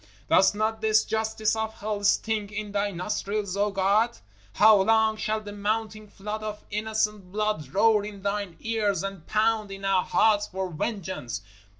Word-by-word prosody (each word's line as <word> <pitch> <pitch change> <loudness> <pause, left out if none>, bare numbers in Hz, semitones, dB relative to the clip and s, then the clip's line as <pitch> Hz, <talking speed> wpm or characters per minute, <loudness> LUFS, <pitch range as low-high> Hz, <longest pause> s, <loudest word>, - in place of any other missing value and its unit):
_ - - -36
Doth 190 +2 +5
not 220 +1 -1
this 220 0 +3
justice 220 0 0
of 220 0 -3
hell 210 -2 -4
stink 210 0 +1
in 210 0 -5
Thy 205 0 0
nostrils, 200 +1 -3
O 205 +1 +1
God? 200 +4 +2 0.4
How 215 - +6
long 220 +1 +3
shall 215 0 -2
the 205 -1 -8
mounting 215 +1 -2
flood 210 +2 -6
of 210 -1 -6
innocent 210 -2 -1
blood 210 -9 -2
roar 210 +2 +4
in 205 -2 -8
Thine 200 -3 -2
ears 215 -4 0
and 195 -4 -6
pound 215 -1 +1
in 195 0 -7
our 190 -2 +3
hearts 215 -2 +3
for 190 -1 -4
vengeance? 185 - -4
210 Hz, 170 wpm, -26 LUFS, 200-220 Hz, 0.4 s, How